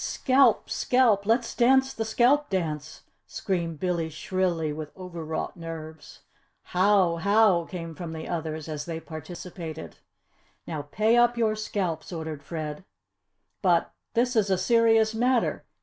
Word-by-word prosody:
"Scalp! 265 +1 +3
scalp! 225 -6 +2
Let's 230 +1 +1
dance 265 +2 +3
the 225 - -3
scalp 255 +6 +3
dance!" 160 -5 -3 0.2
screamed 170 -5 -3
Billy 170 -2 -1
shrilly, 165 -1 -1
with 150 0 -7
overwrought 170 -4 -5
nerves. 160 -2 -9 0.4
"How! 185 -2 +3
How!" 200 -1 +3
came 165 -2 -7
from 170 0 -7
the 160 0 -6
others 160 -2 -4
as 150 -2 -5
they 165 -1 -4
participated. 165 0 -8 0.7
"Now 155 -3 -4
pay 220 +7 +2
up 240 0 +4
your 220 -2 +2
scalps!" 190 -7 -3
ordered 160 -3 -5
Fred. 155 +2 -6 0.8
"But, - - +2 0.2
this 245 +2 +2
is 210 -3 +2
a 190 - +2
serious 225 +1 +3
matter. 245 +2 +1
180 Hz, 135 wpm, -26 LUFS, 160-225 Hz, 0.8 s, up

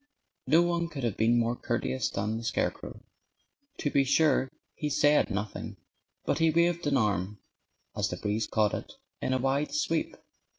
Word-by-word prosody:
No 160 +6 +5
one 170 -1 0
could 145 -6 -7
have 115 -4 0
been 115 +2 +3
more 120 0 +1
courteous 65 - -2
than 105 +3 -2
the - - -8
scarecrow. 115 - -3 0.7
To 145 - -2
be 140 - +4
sure, 140 -1 +3 0.2
he 150 - -3
said 145 +1 +3
nothing. 100 +1 -4 0.5
But - - 0
he 165 0 +4
waved 170 0 +2
an 140 -1 +3
arm 105 -3 0 0.6
(as - - 0
the - - -4
breeze 105 +1 -1
caught 105 -1 +1
it) - - -5 0.3
in - - -1
a 130 - +2
wide 135 +3 0
sweep. 160 +1 -1
130 Hz, 170 wpm, -29 LUFS, 110-150 Hz, 0.7 s, No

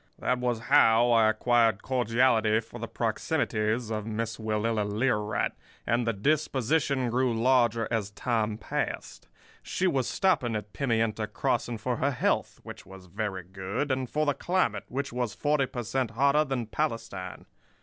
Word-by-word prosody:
"That 125 - 0
was 120 -2 -1
how 120 -3 +5
I 115 -2 +5
acquired 115 -1 +2
cordiality 120 -3 +2
for 115 - -10
the - - -4
proximities 110 +2 -1
of 105 -1 -3
Miss 115 0 -3
Willella 110 0 0
Learight; 105 0 0 0.3
and 120 0 +1
the - - +3
disposition 140 +1 +1
grew 125 -2 +1
larger 120 -2 +3
as 110 -4 -1
time 110 0 -1
passed. - - -4 0.3
She 185 - -2
was 135 -9 +1
stopping 140 - +1
at 105 -1 -5
Pimienta 115 -5 0
Crossing 115 +2 -1
for 120 +2 -2
her 140 - +1
health, 130 - -1
which - - -9
was 95 -1 -13
very 95 0 -4
good, 95 - -3
and 130 -1 -1
for 155 +1 0
the 145 - +2
climate, 185 +6 0
which 135 -1 -4
was 120 -4 -2
forty 145 +3 +1
per 120 -1 -5
cent. 125 +2 -1
hotter 140 +6 +3
than 135 -4 -2
Palestine. 110 -8 -4
115 Hz, 155 wpm, -28 LUFS, 110-130 Hz, 0.3 s, how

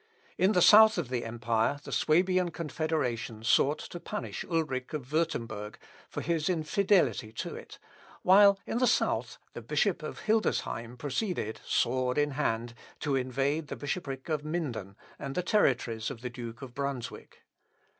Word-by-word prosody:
In 190 +3 +3
the 180 - +4
south 220 0 +8
of 160 -8 -2
the 125 -2 -2
empire 115 +3 0
the - - -8
Swabian 180 +3 +2
confederation 155 -9 -2
sought 140 +5 +3
to 175 - -8
punish 210 +4 -5
Ulric 150 -7 -2
of 140 -5 -4
Wurtemberg, 115 -10 -2 0.3
for - - -4
his 165 0 0
infidelity 175 - +2
to - - -4
it, - - -10 0.5
while 200 +1 +7
in 235 - -2
the 255 - +3
south, 240 - +1 0.2
the - - -7
Bishop - - 0
of - - -6
Hildesheim 125 - 0
proceeded, 145 - -3
sword 125 +1 +1
in 145 0 +2
hand, 115 -2 -1 0.3
to 145 -3 0
invade 135 +4 -1
the - - -5
bishopric 140 -2 -4
of 155 -3 -1
Minden, 145 - -4 0.2
and 135 0 -5
the 180 - 0
territories 125 - +1
of 125 -4 -8
the 125 -1 -5
Duke 120 +1 -8
of 125 -2 -9
Brunswick. 140 -2 -5
140 Hz, 155 wpm, -30 LUFS, 120-175 Hz, 0.5 s, south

